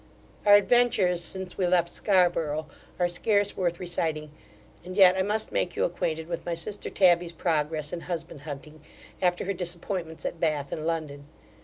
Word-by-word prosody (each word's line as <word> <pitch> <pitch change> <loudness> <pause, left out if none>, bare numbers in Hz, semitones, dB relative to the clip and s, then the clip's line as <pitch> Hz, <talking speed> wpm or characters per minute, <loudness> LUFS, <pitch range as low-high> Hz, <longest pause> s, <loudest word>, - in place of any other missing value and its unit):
Our 205 - +9
adventures 205 -5 +3
since 190 +1 -6
we 185 - +2
left 175 -1 +3
Scarborough, 170 -5 +1 0.3
are 175 - +2
scarce 205 +3 +1
worth 175 -2 -1
reciting; 160 -4 -2 0.5
and 185 +2 -8
yet 185 -2 +8
I 190 - +1
must 210 +3 -1
make 175 - -1
you - - +1
acquainted 160 -2 -2
with 170 -1 -4
my 170 - -2
sister 200 +5 -5
Tabby's 175 -2 +3
progress 155 -3 -1
in 175 - -3
husband 165 -4 -6
hunting, 150 +1 -9 0.4
after 180 -1 +1
her 200 - -1
disappointments 175 -1 -5
at 170 - -3
Bath 150 -4 0
and 155 +1 -3
London. 150 -4 -3
175 Hz, 165 wpm, -27 LUFS, 160-185 Hz, 0.5 s, Our